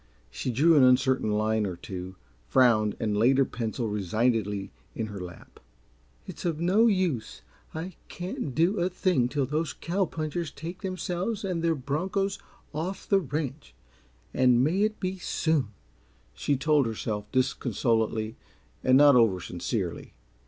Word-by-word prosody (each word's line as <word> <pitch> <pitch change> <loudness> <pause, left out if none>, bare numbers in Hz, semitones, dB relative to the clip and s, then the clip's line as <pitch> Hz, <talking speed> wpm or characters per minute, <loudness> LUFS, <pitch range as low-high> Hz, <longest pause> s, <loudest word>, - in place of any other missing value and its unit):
She 125 - -4
drew 150 +8 +4
an 145 - +6
uncertain 130 -2 +4
line 110 +1 +1
or 95 -3 -3
two, 90 +1 -7 0.3
frowned 110 - +3
and 105 -2 0
laid 120 +6 +4
her 135 - +4
pencil 115 0 -3
resignedly 105 0 0 0.2
in 110 - -2
her 100 - -6
lap. 90 -2 -10 0.7
"It's - - -9
of 165 -3 -1
no 195 +7 +4
use. 185 - -1 0.3
I 170 +4 -5
can't 175 -7 -5
do 175 +7 +2
a 175 +1 +1
thing 180 -8 +1
till 140 0 0
those 150 +2 -2
cow 190 +3 -1
punchers 160 0 -3
take 170 +6 -8
themselves 185 +2 -3
and 175 -3 -2
their 165 -1 +2
bronchos 185 +9 -2 0.3
off 170 +6 -4
the 195 - +4
ranch 135 - -5 0.6
and 125 -1 +4
may 170 +8 +1
it 215 0 0
be 185 0 -3
soon!" 160 -6 0 0.7
she 140 - 0
told 145 -2 +3
herself, 105 -2 -4
disconsolately 115 -3 0 0.5
and 130 0 +5
not 145 -1 +7
oversincerely. 95 -3 0
135 Hz, 145 wpm, -27 LUFS, 110-170 Hz, 0.7 s, not